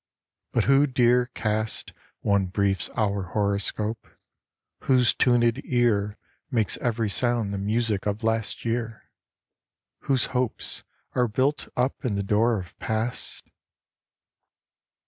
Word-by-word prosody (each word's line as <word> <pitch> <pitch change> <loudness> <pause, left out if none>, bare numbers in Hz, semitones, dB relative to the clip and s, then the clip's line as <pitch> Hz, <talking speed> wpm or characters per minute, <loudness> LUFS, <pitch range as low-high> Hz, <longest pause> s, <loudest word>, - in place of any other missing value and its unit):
But - - +2
who 140 +2 +5
dare 125 -1 +3
cast 110 -2 -2 0.3
One 100 -2 +2
brief 95 0 0
hour's 100 -5 -1
horoscope, 105 +2 -1 0.8
whose 125 -3 +4
tuned 120 -2 +3
ear 110 -5 +1 0.3
Makes 115 -7 +1
every 115 -2 0
sound 115 -1 0
the 100 - -2
music 105 0 0
of 105 +2 -2
last 115 0 -1
year? 115 -1 -3 0.9
Whose 130 -3 +2
hopes 125 -2 -2 0.3
are 125 -1 +2
built 130 +7 0
up 125 +2 0
in 120 -6 0
the 100 - -1
door 110 +3 +2
of 90 -2 -10
Past 110 +2 -2
115 Hz, 115 wpm, -26 LUFS, 105-120 Hz, 0.9 s, who